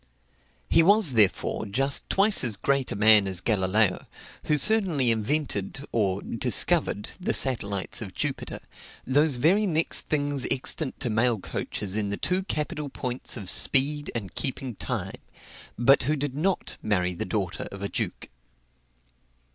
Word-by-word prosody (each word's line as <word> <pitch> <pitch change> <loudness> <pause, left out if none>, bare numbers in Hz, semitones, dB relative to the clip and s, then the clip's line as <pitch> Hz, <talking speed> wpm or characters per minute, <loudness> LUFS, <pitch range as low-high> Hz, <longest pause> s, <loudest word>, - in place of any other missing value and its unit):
He - - +4
was, 200 -1 +5
therefore, 110 0 +2
just 135 +7 0
twice 200 -2 +4
as 115 -4 +2
great 140 +5 -1
a - - -3
man 105 -1 +6
as 95 -2 0
Galileo, 100 0 +1 0.4
who 150 - +2
certainly 170 - +2
invented 120 +1 -2
(or 100 -4 -1
discovered) 105 - 0
the 180 - -1
satellites 100 -8 -1
of 95 -4 -8
Jupiter, - - -4 0.4
those 145 +2 +2
very 190 - +2
next 165 -2 0
things 145 -3 -1
extant 135 +2 -1
to 120 - -1
mail 115 +1 +1
coaches 100 0 -5
in 105 -2 -1
the 100 - -3
two 185 +1 0
capital 150 -4 -4
points 125 -1 -4
of 100 -5 -8
speed 145 +8 +3
and 100 -6 -5
keeping 130 -2 -3
time, - - -5 0.6
but 135 +4 +4
who 150 +5 0
did 145 -2 -4
not 180 +7 -2
marry 90 -4 0
the 85 - -4
daughter 95 -1 -3
of 100 0 -9
a - - -1
duke. - - -4
125 Hz, 145 wpm, -25 LUFS, 100-150 Hz, 0.6 s, man